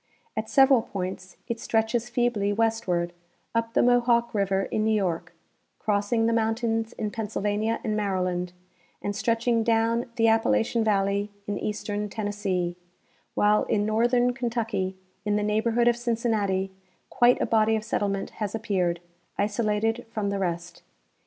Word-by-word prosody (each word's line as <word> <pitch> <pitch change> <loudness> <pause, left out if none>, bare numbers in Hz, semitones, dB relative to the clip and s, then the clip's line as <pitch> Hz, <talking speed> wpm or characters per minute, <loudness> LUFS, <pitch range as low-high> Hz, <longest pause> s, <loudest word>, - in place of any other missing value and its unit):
At - - -3
several 270 -3 +6
points 185 -2 -6
it 230 -1 -3
stretches 225 +2 0
feebly 240 -4 +1
westward, 200 -6 0 0.4
up 230 0 -1
the - - +5
Mohawk 240 -1 +3
river 195 -2 +1
in 215 - -1
New 220 0 +2
York, 185 -5 -2 0.4
crossing 210 +2 +1
the 230 - +2
mountains 225 0 0
in 210 -1 -3
Pennsylvania 215 0 -1
and 215 -3 -1
Maryland, 185 -3 -1 0.5
and 205 0 -2
stretching 230 +1 +1
down 230 +1 +2
the 225 -2 +3
Appalachian 225 - +2
valley 200 -1 +1 0.2
in 205 -1 -3
eastern 210 0 -3
Tennessee, 200 -4 -2 0.6
while 210 +1 +3
in 205 -1 +1
northern 240 +3 +2
Kentucky, 225 -6 -2 0.3
in 210 -1 0
the 210 - +1
neighborhood 225 +3 +2
of 240 - +5
Cincinnati, 220 -5 0 0.4
quite 245 0 +4
a - - +1
body 220 0 +3
of 215 - -2
settlement 200 -3 -1
has 210 0 -1
appeared, 185 -6 0 0.4
isolated 215 +3 0
from 210 -3 -2
the 200 - -2
rest. 175 -2 -3
215 Hz, 140 wpm, -26 LUFS, 200-230 Hz, 0.6 s, several